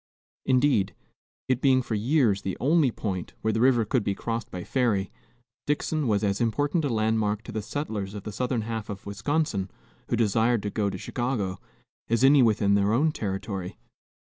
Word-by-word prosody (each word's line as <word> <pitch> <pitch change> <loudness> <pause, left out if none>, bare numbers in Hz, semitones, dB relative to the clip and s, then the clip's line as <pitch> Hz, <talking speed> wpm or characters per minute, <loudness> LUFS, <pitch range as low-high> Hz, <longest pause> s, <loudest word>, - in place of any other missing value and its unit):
Indeed, 130 -6 +2 0.5
it 130 -1 +1
being 130 -2 +4
for 115 - -4
years 110 -2 +2
the 95 - -3
only 150 +1 +3
point 95 -6 -4
where 110 - 0
the 110 - 0
river 125 -3 +4
could 115 +2 0
be 100 - -1
crossed 115 +2 -4
by 90 -1 -6
ferry, 105 -6 0 0.6
Dixon 150 0 0
was 105 -1 +1
as 100 +1 0
important 145 +8 +1
a 145 - 0
landmark 110 -2 0
to - - -8
the 110 - -3
settlers 105 -4 -4
of 100 - -6
the 105 - -5
southern 125 +2 -1
half 110 -1 -4
of 100 -1 -7
Wisconsin 105 -1 -1 0.4
who - - 0
desired 115 0 +2
to 105 - -3
go 105 -1 0
to 95 - -5
Chicago, 105 -4 -2 0.5
as 115 +2 +2
any 140 +1 +7
within 105 -4 +3
their 100 +1 +3
own 150 +7 +3
territory. 95 -5 -4
110 Hz, 180 wpm, -26 LUFS, 100-130 Hz, 0.6 s, any